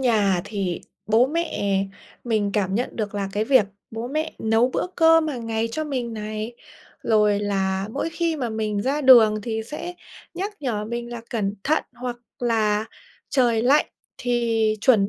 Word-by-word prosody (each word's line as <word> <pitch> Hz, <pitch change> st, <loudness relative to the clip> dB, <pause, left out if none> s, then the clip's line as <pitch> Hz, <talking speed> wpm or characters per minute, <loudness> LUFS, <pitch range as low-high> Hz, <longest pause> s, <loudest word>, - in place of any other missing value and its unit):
nhà 210 Hz, -7 st, +3 dB
thì 195 Hz, -4 st, -3 dB, 0.3 s
bố 225 Hz, +4 st, +4 dB
mẹ 265 Hz, -, 0 dB, 0.4 s
mình 215 Hz, -4 st, +1 dB
cảm 195 Hz, -2 st, 0 dB
nhận 245 Hz, +4 st, -2 dB
được 210 Hz, -2 st, -3 dB
là 200 Hz, -1 st, -2 dB
cái 210 Hz, +2 st, 0 dB
việc 260 Hz, -3 st, +5 dB, 0.3 s
bố 225 Hz, +2 st, -5 dB
mẹ 310 Hz, +3 st, -2 dB
nấu 225 Hz, +3 st, +2 dB
bữa -, -, 0 dB
cơm 325 Hz, -1 st, +5 dB
hàng 245 Hz, -6 st, -4 dB
ngày 225 Hz, 0 st, -1 dB
cho 310 Hz, +5 st, -2 dB
mình 255 Hz, -6 st, -3 dB
này. 215 Hz, +2 st, -5 dB, 0.5 s
Rồi 210 Hz, -2 st, +3 dB
là 195 Hz, -1 st, -1 dB
mỗi 300 Hz, +5 st, -2 dB
khi 330 Hz, -1 st, -1 dB
mà 255 Hz, -5 st, -2 dB
mình 215 Hz, -2 st, -1 dB
ra 275 Hz, +5 st, 0 dB
đường 230 Hz, -6 st, +7 dB
thì 220 Hz, 0 st, -2 dB
sẽ 345 Hz, +7 st, -6 dB, 0.4 s
nhắc 390 Hz, +4 st, -3 dB
nhở 225 Hz, -6 st, -2 dB
mình 235 Hz, +2 st, -5 dB
là 235 Hz, -, -5 dB
cẩn 205 Hz, -4 st, -1 dB
thận, 310 Hz, +2 st, +2 dB
hoặc 245 Hz, 0 st, -5 dB, 0.2 s
là 220 Hz, -3 st, +1 dB, 0.4 s
trời 240 Hz, -5 st, +2 dB
lạnh 275 Hz, +5 st, +4 dB, 0.3 s
thì 230 Hz, -3 st, +1 dB
chuẩn 210 Hz, -5 st, +4 dB
225 Hz, 170 wpm, -23 LUFS, 210-260 Hz, 0.5 s, đường